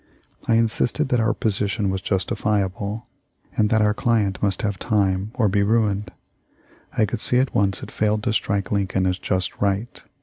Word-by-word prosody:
I 115 - +3
insisted 115 +3 +2
that 125 - +2
our 115 +1 +2
position 100 -1 -1
was 95 0 -3
justifiable, 100 +2 -1 0.5
and 105 -1 +2
that 110 0 +3
our 105 0 +3
client 105 -4 0
must 95 -3 0
have 100 -3 -2
time 100 -3 0
or 115 -4 +2
be 100 +1 +2
ruined. 105 -1 +1 0.9
I 110 - +4
could 105 - -4
see 125 - +4
at 130 +1 +1
once 100 -2 +1
it - - -8
failed 105 0 0
to 115 - 0
strike 100 -4 -1
Lincoln 95 -2 0
as 90 0 0
just 95 -2 -2
right. 100 +3 -1
105 Hz, 175 wpm, -22 LUFS, 95-110 Hz, 0.9 s, I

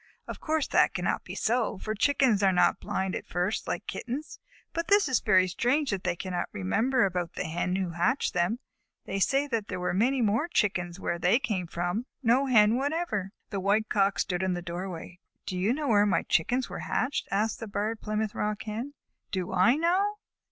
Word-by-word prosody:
Of - - -6
course 315 -2 0
that - - +3
cannot - - -1
be - - -8
so, 230 -2 0
for 215 +3 -3
Chickens 235 -1 +3
are 195 -1 +4
not 180 - +3
blind 190 -1 -2
at - - -6
first, 180 +4 -1
like - - -3
Kittens, 265 +6 -5 0.3
but 335 +3 -3
it 405 -4 +5
is 260 -3 +2
very 185 -3 +4
strange 255 - +1
that 190 -2 -2
they 180 -1 0
cannot 175 0 -3
remember 220 - +1
about 180 -3 -2
the - - -3
Hen 175 +3 -1
who 190 -2 -1
hatched 175 +11 0
them. 180 +6 +1 0.5
They 195 - -3
say 270 +9 +2
that 225 -4 -1
there 185 - -4
were 180 - -1
many 250 +8 +2
more 220 +8 +1
Chickens 185 - 0
where 170 -2 -2
they 180 +6 +4
came 200 -9 -2
from, 175 +9 -2 0.2
but - - -4
no 260 +4 +4
Hen 220 -2 +5
whatever." 280 - -1 0.2
The 200 - -2
White 205 +3 +1
Cock 200 -1 +2
stood 180 -1 -1
in 185 -1 0
the 175 - -5
doorway. 175 0 -6 0.3
"Do 185 - -4
you 185 +5 +1
know 290 +1 -1
where 205 -2 +5
my 200 - +2
Chickens 245 +10 +1
were - - -6
hatched?" 255 +3 -1
asked 210 +2 0
the 225 - -6
Barred 215 +2 -2
Plymouth 215 0 -2
Rock 210 -1 -2
Hen. 230 +7 -5 0.3
"Do 185 -1 -3
I 190 +7 +5
know?" 370 +6 +1
210 Hz, 205 wpm, -28 LUFS, 185-250 Hz, 0.5 s, it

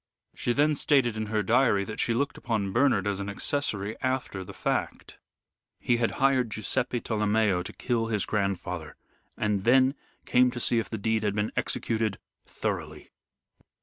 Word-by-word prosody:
She - - -2
then 150 +5 +3
stated 135 -5 +2
in 110 0 -3
her 105 0 0
diary 115 -2 +3
that 110 +2 -7
she 115 - +1
looked 140 +4 -1
upon 110 -5 -2
Bernard 120 -4 +3
as 100 -1 -1
an 100 0 -4
accessory 105 -2 -1
after 130 -7 -2
the - - -10
fact. - - -3 0.6
He 120 - +1
had 115 -1 0
hired 135 -3 +3
Guiseppe 120 +4 -1
Tolomeo 105 -4 +1
to 90 - -6
kill 115 -2 -1
his 105 -3 0
grandfather, 90 -5 -2 0.4
and 105 -2 0
then 130 +3 +5 0.3
came 125 0 +4
to 125 0 -5
see 120 0 +2
if 115 - -4
the 110 - -3
deed 110 +1 0
had 105 -2 -1
been 105 0 -1
executed 110 -3 -1 0.3
thoroughly. - - -4
110 Hz, 165 wpm, -27 LUFS, 100-125 Hz, 0.6 s, then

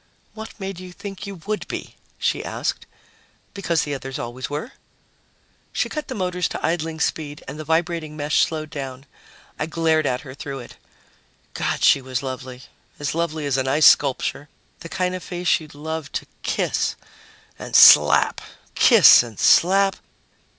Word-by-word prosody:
"What 220 0 -10
made 195 -2 -6
you 185 0 -10
think 195 +2 -8
you 200 - -7
would 215 +1 -3
be?" - - -7 0.2
she - - -1
asked. - - -4 0.7
"Because 175 -5 0
the 145 - -4
others 135 -1 -6
always 120 +2 -6
were." 150 - -5 1.0
She - - -1
cut 305 -1 -5
the 260 - -5
motors 180 -3 -1
to - - -4
idling 165 -1 -2
speed 150 -2 -3
and 150 - -7
the - - -5
vibrating 160 -1 -1
mesh 150 0 +1
slowed 155 -1 -2
down. 135 -3 -7 0.5
I 150 - -2
glared 160 -2 +1
at 125 0 -1
her 130 -3 -10
through 140 0 -7
it. 120 -2 -11 0.8
God, - - -2
she 140 - +5
was 130 0 -4
lovely 130 -1 -7 0.3
as 145 -2 -3
lovely 160 -2 -2
as 140 -2 0
an 130 0 -1
ice 145 +3 +3
sculpture! 140 +1 +3 0.3
The 165 - -10
kind 180 +1 -1
of 185 - -5
face 180 0 0
you'd 155 -2 -13
love 160 0 -6
to - - -3 0.2
kiss - - -1 0.6
and - - -6
slap, - - +7 0.3
kiss - - +7
and 115 -4 -9
slap.... 195 +2 +4
155 Hz, 165 wpm, -22 LUFS, 140-180 Hz, 1.0 s, slap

